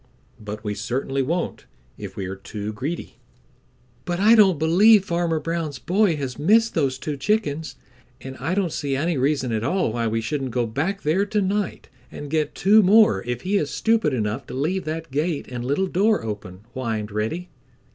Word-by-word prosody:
"But 105 Hz, 0 st, -7 dB
we 105 Hz, -1 st, -2 dB
certainly 130 Hz, +6 st, -2 dB
won't 170 Hz, +6 st, -2 dB, 0.3 s
if 100 Hz, -2 st, -8 dB
we 95 Hz, -, -4 dB
are 95 Hz, +1 st, -5 dB
too 105 Hz, +2 st, -6 dB
greedy." 145 Hz, +11 st, -5 dB, 0.9 s
"But 175 Hz, 0 st, -3 dB
I 215 Hz, +3 st, +6 dB
don't 200 Hz, -7 st, +6 dB
believe 190 Hz, +7 st, +5 dB
Farmer 170 Hz, -2 st, 0 dB
Brown's 165 Hz, -4 st, -3 dB
boy 180 Hz, -, +2 dB
has 135 Hz, -2 st, -5 dB
missed 225 Hz, +8 st, +4 dB
those 130 Hz, -2 st, 0 dB
two 150 Hz, +2 st, -4 dB
chickens, 155 Hz, -, -1 dB, 0.4 s
and 130 Hz, 0 st, -8 dB
I 180 Hz, -, -2 dB
don't 190 Hz, -4 st, 0 dB
see 140 Hz, -2 st, -2 dB
any 165 Hz, +5 st, 0 dB
reason 135 Hz, -1 st, 0 dB
at 110 Hz, -1 st, -1 dB
all 160 Hz, -, 0 dB
why 115 Hz, -1 st, -1 dB
we 115 Hz, +1 st, 0 dB
shouldn't 135 Hz, +4 st, -2 dB
go 120 Hz, 0 st, 0 dB
back 155 Hz, -, -2 dB
there 185 Hz, +7 st, +1 dB
to 210 Hz, +1 st, 0 dB
night 200 Hz, -1 st, -2 dB, 0.2 s
and 145 Hz, -1 st, -8 dB
get 155 Hz, -1 st, 0 dB
two 210 Hz, +3 st, +5 dB
more 200 Hz, -, +5 dB
if 120 Hz, 0 st, -3 dB
he 200 Hz, +2 st, +1 dB
is 145 Hz, -, -2 dB
stupid 225 Hz, -8 st, +1 dB
enough 110 Hz, +1 st, -2 dB
to -, -, -7 dB
leave 165 Hz, +8 st, -1 dB
that 160 Hz, 0 st, -5 dB
gate 150 Hz, +2 st, -1 dB
and 125 Hz, -1 st, -5 dB
little 145 Hz, +9 st, 0 dB
door 205 Hz, +4 st, +2 dB
open," 100 Hz, -3 st, -6 dB
whined 110 Hz, -4 st, -3 dB
Reddy. 115 Hz, -, -3 dB
150 Hz, 185 wpm, -23 LUFS, 120-185 Hz, 0.9 s, I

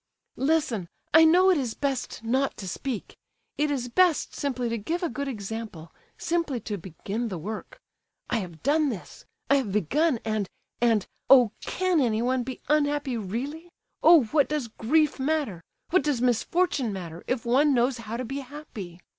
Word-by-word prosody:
"Listen—I 290 Hz, -, +2 dB
know 365 Hz, +4 st, +6 dB
it 350 Hz, -, +3 dB
is 245 Hz, -5 st, -3 dB
best 270 Hz, -5 st, -3 dB
not 260 Hz, +4 st, 0 dB
to 195 Hz, -, -7 dB
speak! 240 Hz, +3 st, -4 dB, 0.4 s
It 300 Hz, 0 st, +2 dB
is 265 Hz, -4 st, -1 dB
best 345 Hz, +5 st, +2 dB
simply 255 Hz, -4 st, -2 dB
to 230 Hz, -, -1 dB
give 335 Hz, -, -3 dB
a 345 Hz, -, +1 dB
good 280 Hz, +3 st, -4 dB
example—simply 225 Hz, -, -4 dB
to 210 Hz, 0 st, -4 dB
begin 195 Hz, +7 st, -4 dB
the 190 Hz, -5 st, -4 dB
work. 215 Hz, -, -7 dB, 0.5 s
I 240 Hz, -, 0 dB
have 175 Hz, -7 st, -6 dB
done 300 Hz, +1 st, +3 dB
this—I 245 Hz, +5 st, -3 dB
have 250 Hz, -8 st, -1 dB
begun, 255 Hz, -, +1 dB
and—and—oh! 220 Hz, +3 st, +2 dB
can 370 Hz, -3 st, +1 dB
anyone 245 Hz, +2 st, +1 dB
be 255 Hz, +1 st, -6 dB
unhappy, 290 Hz, -3 st, +1 dB
really? 260 Hz, -, -4 dB, 0.3 s
Oh! 325 Hz, -3 st, +8 dB
what 275 Hz, +4 st, +2 dB
does 295 Hz, -6 st, -2 dB
grief 295 Hz, +8 st, +1 dB
matter—what 290 Hz, -, -1 dB
does 290 Hz, -5 st, 0 dB
misfortune 250 Hz, +2 st, +1 dB
matter, 175 Hz, -3 st, -7 dB
if 255 Hz, -2 st, -1 dB
one 275 Hz, +4 st, +4 dB
knows 245 Hz, +1 st, +2 dB
how 225 Hz, 0 st, -5 dB
to 255 Hz, -, -3 dB
be 270 Hz, +4 st, -4 dB
happy? 245 Hz, -, -9 dB
255 Hz, 150 wpm, -26 LUFS, 220-295 Hz, 0.5 s, Oh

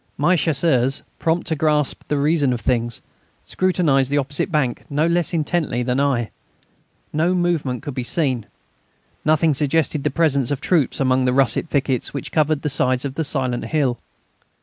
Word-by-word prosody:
My 175 Hz, +6 st, +3 dB
Chasseurs, 140 Hz, -5 st, +1 dB, 0.2 s
prompt 165 Hz, +1 st, 0 dB
to 160 Hz, -, -1 dB
grasp 150 Hz, -1 st, 0 dB
the 150 Hz, -, 0 dB
reason 145 Hz, -2 st, +2 dB
of 120 Hz, -, -4 dB
things, 120 Hz, -2 st, -1 dB, 0.4 s
scrutinised 160 Hz, -8 st, +1 dB
the 145 Hz, -, 0 dB
opposite 145 Hz, +4 st, -1 dB
bank 135 Hz, -7 st, 0 dB
no 145 Hz, +2 st, +1 dB
less 170 Hz, 0 st, +1 dB
intently 155 Hz, -6 st, -1 dB
than 125 Hz, +2 st, 0 dB
I. 130 Hz, -5 st, 0 dB, 0.8 s
No 165 Hz, +4 st, +1 dB
movement 165 Hz, -9 st, -1 dB
could 145 Hz, -, -5 dB
be 125 Hz, -, -3 dB
seen; 125 Hz, -4 st, 0 dB, 0.8 s
nothing 155 Hz, 0 st, +3 dB
suggested 150 Hz, +1 st, 0 dB
the -, -, +1 dB
presence 140 Hz, -4 st, +1 dB
of 145 Hz, -2 st, -1 dB
troops 150 Hz, -3 st, +1 dB
among 130 Hz, -1 st, +2 dB
the 125 Hz, -, +2 dB
russet 135 Hz, +4 st, +2 dB
thickets 135 Hz, -2 st, -1 dB
which 140 Hz, -, -5 dB
covered 155 Hz, -1 st, +1 dB
the -, -, -1 dB
sides 130 Hz, -1 st, +1 dB
of 135 Hz, -, -3 dB
the 160 Hz, -, -2 dB
silent 130 Hz, -4 st, -1 dB
hill. 135 Hz, -6 st, 0 dB
145 Hz, 170 wpm, -21 LUFS, 130-160 Hz, 0.8 s, My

